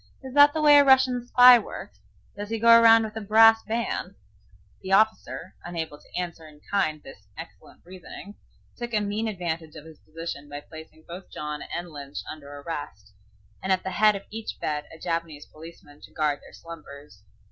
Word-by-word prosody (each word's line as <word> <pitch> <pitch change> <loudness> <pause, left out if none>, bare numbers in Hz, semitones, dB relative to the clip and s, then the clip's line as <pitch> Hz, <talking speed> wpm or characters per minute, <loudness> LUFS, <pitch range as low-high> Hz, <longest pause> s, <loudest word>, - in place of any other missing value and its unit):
Is 260 -1 -9
that 290 +1 +7
the 315 - -2
way 295 -1 +8
a - - +6
Russian 260 -3 +3
spy 250 0 +8
works? 210 - -10 0.4
Does 205 0 -7
he 225 - -2
go 230 +1 +2
around 225 0 +6
with 220 0 -7
a 220 - -5
brass 225 +2 +5
band?" 230 +2 -4 0.7
The 190 - -3
officer, 200 -4 0
unable 160 -4 -6
to - - -18
answer 170 -3 -6
in 150 -1 -17
kind 155 -7 -1
this 100 -7 -14
excellent - - -12
reasoning, 185 +2 -11 0.4
took 240 -2 -5
a - - +3
mean 210 +2 -3
advantage 170 -6 -5
of 155 -1 -11
his 160 -2 -15
position 155 -2 -8
by 145 0 -7
placing 160 +1 -14
both 180 +2 -10
John 150 0 -6
and 175 0 -7
Lynch 140 -1 -10
under 145 -2 -10
arrest, 145 -9 -8 0.5
and 190 - -2
at 185 -1 +1
the 190 - -4
head 210 +3 +3
of 200 - -7
each 220 +1 -7
bed 150 -1 -3
a 160 - -12
Japanese 165 -3 -4
policeman 155 -2 -15
to - - -14
guard 150 -2 -1
their - - -17
slumbers. 145 -9 -13
175 Hz, 190 wpm, -25 LUFS, 155-220 Hz, 0.7 s, way